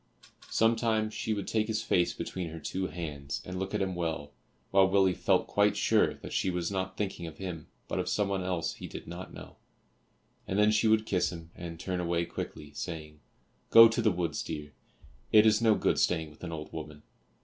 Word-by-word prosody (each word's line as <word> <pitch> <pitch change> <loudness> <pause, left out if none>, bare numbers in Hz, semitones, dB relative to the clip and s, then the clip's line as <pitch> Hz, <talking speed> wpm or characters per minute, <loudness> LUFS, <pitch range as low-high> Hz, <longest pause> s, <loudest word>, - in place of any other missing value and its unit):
Sometimes 110 -1 +2
she 110 - -3
would 100 -2 -2
take 110 -1 +1
his 110 -1 -1
face 90 -1 +2
between 90 -3 -5
her 80 +1 -7
two 95 +4 -3
hands 75 -4 -5
and 95 0 -5
look 95 +2 -3
at 100 - +1
him 95 -1 -2
well 80 -4 -3 0.4
while 95 0 +5
Willie 95 -1 +4
felt - - +2
quite - - +2
sure - - +3
that - - -9
she - - +1
was 90 0 -2
not 95 -1 -3
thinking 95 -4 -3
of 80 - -10
him, 90 -5 -6 0.2
but - - -2
of - - -1
someone 100 -2 0
else 85 -3 -1
he - - -8
did - - -8
not 90 +2 -8
know, - - -11 0.9
and 95 - -1
then 105 +1 +5
she 110 +1 +3
would 110 0 +4
kiss 95 -4 +1
him, 85 -1 -9
and 85 -2 -8
turn 90 +1 -3
away 85 -1 0
quickly, 75 -3 -7
saying, 75 -2 -6 0.5
"Go 115 0 +10
to 115 +1 0
the 110 - +4
woods, 90 -3 -1
dear; 75 -2 -6 0.6
it 110 0 +7
is 110 0 +4
no 110 -2 +5
good - - +1
staying 80 -3 +1
with 75 - -18
an 85 - -4
old 75 -1 -7
woman." 75 -2 -7
90 Hz, 205 wpm, -30 LUFS, 80-105 Hz, 0.9 s, Go